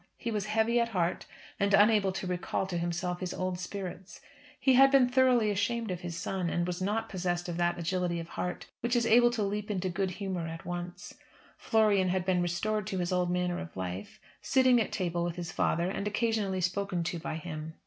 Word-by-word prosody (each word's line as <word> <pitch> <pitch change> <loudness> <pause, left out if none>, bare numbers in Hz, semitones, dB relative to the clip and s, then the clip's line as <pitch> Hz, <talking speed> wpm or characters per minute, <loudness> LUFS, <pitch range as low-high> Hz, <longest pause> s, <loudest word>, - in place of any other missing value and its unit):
He 235 - -3
was 210 -2 -2
heavy 220 +2 +2
at 235 0 +1
heart, 180 -4 -1 0.3
and 200 0 +4
unable 205 -1 +5
to 190 0 -4
recall 180 +1 -2
to 185 -2 -3
himself 175 +1 -2
his 185 -2 -4
old 185 -1 -2
spirits. 185 -1 -6 0.4
He 265 - +4
had 270 +2 +7
been 270 -2 +5
thoroughly 250 -4 +3
ashamed 220 +2 -1
of 180 - -3
his 175 -2 -5
son, 185 -1 -2
and 175 0 0
was 180 0 -3
not 215 +4 -1
possessed 175 -2 -2
of 170 -1 -4
that 175 0 +1
agility 175 0 -1
of 165 - -7
heart 180 - -4
which 240 +1 0
is 235 -1 +2
able 240 +1 +6
to 235 -3 -1
leap 205 +1 -2
into 190 -2 -1
good 190 +2 -1
humour 185 -3 -4
at 165 0 -7
once. 175 0 -6 0.4
Florian 210 -4 +2
had 185 0 0
been 180 -1 +2
restored 200 +4 -1
to 195 -3 -2
his 175 -1 -1
old 180 -1 +1
manner 180 0 0
of 180 - -8
life; 95 +2 -5 0.2
sitting 255 -3 +4
at - - -2
table 175 -3 -1
with 175 -1 -2
his 175 -1 -5
father 175 -1 0
and 200 - -3
occasionally 210 -3 0
spoken 185 0 -1
to 170 0 -3
by 160 - -4
him. 160 -1 -6
185 Hz, 210 wpm, -30 LUFS, 175-210 Hz, 0.4 s, had